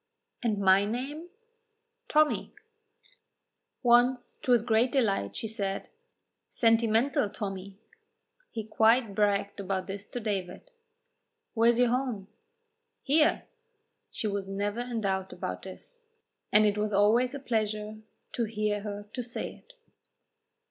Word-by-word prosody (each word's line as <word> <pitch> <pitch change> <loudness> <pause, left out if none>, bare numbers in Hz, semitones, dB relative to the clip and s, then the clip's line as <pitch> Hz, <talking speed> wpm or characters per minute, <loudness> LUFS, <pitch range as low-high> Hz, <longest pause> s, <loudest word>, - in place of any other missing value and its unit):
"And 220 -4 0
my 195 0 +5
name?" 270 +10 -4 0.8
"Tommy." 305 -7 +2 1.3
Once, 245 +1 +3
to 255 - -1
his 240 -3 +5
great 230 +2 +2
delight, 200 - 0
she 225 - -3
said, 200 -3 -3 0.6
"Sentimental 225 0 +2
Tommy." 195 -2 -6 0.7
He 225 - -5
quite 220 +1 +3
bragged 200 0 +1
about 190 -1 -2
this 200 +1 -7
to 245 - -4
David. 205 - -4 0.8
"Where 230 0 +4
is 235 - +3
your 245 -1 +4
home?" 240 -6 -2 0.7
"Here." 305 +4 +3 0.7
She - - -5
was 200 -2 -2
never 205 +3 -2
in 240 -2 -3
doubt 190 -2 -2
about - - -5
this, - - -12 0.5
and 210 +1 +6
it 210 0 +1
was 210 0 0
always 230 +6 +3
a - - -5
pleasure 215 -3 -2 0.3
to 215 -2 -1
her 205 0 -5
to 250 - -3
say 240 0 -5
it. - - -19
220 Hz, 125 wpm, -29 LUFS, 200-245 Hz, 1.3 s, and